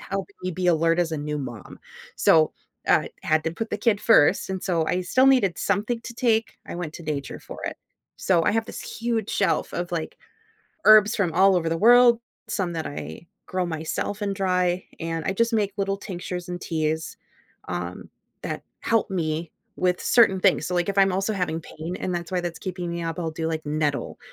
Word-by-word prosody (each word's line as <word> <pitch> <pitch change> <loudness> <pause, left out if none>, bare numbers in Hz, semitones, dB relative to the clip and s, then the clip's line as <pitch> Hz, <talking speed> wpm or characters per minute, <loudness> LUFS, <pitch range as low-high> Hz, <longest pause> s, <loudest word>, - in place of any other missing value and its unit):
helping 195 0 -5
me 185 - -2
be 180 +1 -2
alert 165 0 +3
as 170 -2 +1
a - - -1
new 150 0 -3
mom, 125 -5 -8 0.4
so, 155 -1 +4 0.4
uh, - - +4 0.2
had 155 0 +1
to 165 - -1
put 225 +6 -5
the 210 - -2
kid 210 -2 +2
first, 190 -5 +4
and 190 -1 -3
so 170 -4 +1
I 180 +3 0
still 255 +9 +3
needed 250 -10 +4
something 210 +4 0
to 230 - -8
take, 230 -2 +1
I - - -6
went 165 -3 -5
to - - -8
nature 145 -3 -4
for - - -10
it. - - -4 0.4
So, 175 -3 +2
I - - +3
have 225 +1 +1
this - - -7
huge 230 -2 -2
shelf 200 - 0
of, 175 +1 -3
like, 165 -2 -3 0.7
herbs 215 0 +8
from 185 -6 +1
all 190 +1 +5
over 165 -2 0
the 165 - 0
world, 240 +2 +6 0.3
some 185 -4 -1
that 160 -1 -3
I 145 +3 -7 0.2
grow 185 -1 -1
myself 165 +5 -3
and 200 -1 -1
dry, 180 -2 +1 0.2
and 165 -1 -3
I - - +1
just 230 +3 +1
make 205 -3 +1
little 195 -1 0
tinctures 180 -2 -6
and 175 0 -4
teas, 160 -1 -2 0.5
um, - - -5 0.3
that - - -4 0.2
help 225 -2 +1
me 165 -3 -2 0.3
with 180 -1 +1
certain 205 -6 +4
things, - - +3
so, 180 - -2
like, 175 +1 0
if 200 - -6
I'm 195 -1 +5
also 195 +3 0
having 180 -4 -1
pain 165 +2 -7
and 180 - -3
that's 170 0 -4
why 180 - +1
that's 175 -1 -5
keeping 180 -2 -4
me 170 0 -3
up, 165 0 -4
I'll 165 -2 -2
do, 160 0 -3
like, 160 -1 -4
nettle 150 -1 -1
180 Hz, 205 wpm, -24 LUFS, 165-200 Hz, 0.7 s, herbs